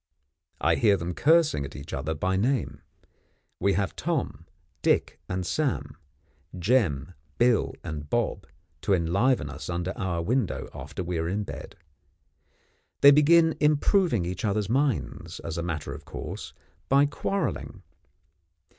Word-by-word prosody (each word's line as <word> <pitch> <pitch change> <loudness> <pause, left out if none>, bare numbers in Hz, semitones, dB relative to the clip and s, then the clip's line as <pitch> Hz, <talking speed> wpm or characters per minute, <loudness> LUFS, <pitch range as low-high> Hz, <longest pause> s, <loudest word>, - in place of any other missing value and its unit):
I - - +2
hear 105 -3 +4
them 85 0 -4
cursing 155 - +3
at 70 - -8
each 70 0 -8
other 75 +4 -2
by 95 +5 0
name. 120 +4 0 0.8
We 100 - +2
have 100 -1 -1
Tom, 150 - -2 0.3
Dick, - - +1
and 90 -1 -2
Sam, 145 - -1 0.6
Jem, 90 - +1 0.2
Bill, 120 -1 +2
and 75 -1 -6
Bob, - - -1 0.3
to 100 - +3
enliven 95 - +1
us 70 +3 -7
under 90 +2 -2
our 85 -3 -2
window 120 +2 -1
after - - -6
we 85 -1 -2
are 80 +1 -1
in 105 +3 -1
bed. - - -8 1.3
They 140 - +10
begin 160 +3 +5
improving 150 - +3
each 90 +1 -4
other's 105 -1 0
minds, 135 -1 -1
as 80 0 -4
a - - -1
matter 80 -4 -4
of 75 +1 -9
course, - - -7 0.3
by 140 +1 +5
quarrelling. 195 +7 -3
95 Hz, 135 wpm, -27 LUFS, 85-135 Hz, 1.3 s, They